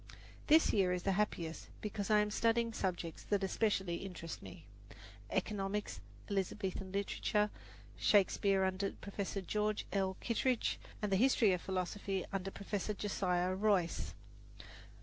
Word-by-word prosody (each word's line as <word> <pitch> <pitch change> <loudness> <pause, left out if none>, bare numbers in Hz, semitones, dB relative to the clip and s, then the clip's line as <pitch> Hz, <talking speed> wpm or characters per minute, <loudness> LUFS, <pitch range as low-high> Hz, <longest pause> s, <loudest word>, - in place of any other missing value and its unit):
This 315 +2 +6
year 190 -4 +3
is 180 -1 -2
the 195 - +2
happiest 180 -5 -1
because 205 -2 -3
I 210 -1 +6
am 210 0 -1
studying 230 +1 +2
subjects 175 -5 -2
that 205 -1 +1
especially 190 -3 +1
interest 180 -4 -6
me, 95 -2 -11 0.6
economics, 200 - -2 0.3
Elizabethan 190 -1 -2
literature, 210 +1 0 0.5
Shakespeare 195 -1 +4
under 190 +1 0
Professor 200 0 -4
George 210 +2 -1
L. 190 -1 0
Kittredge, 245 +1 +1 0.2
and 210 - 0
the 190 - +4
History 230 -3 +5
of 180 - -1
Philosophy 190 +1 -2
under 195 0 -1
Professor 200 +1 -3
Josiah 185 -3 0
Royce. 190 -3 +1
195 Hz, 130 wpm, -35 LUFS, 185-210 Hz, 0.6 s, This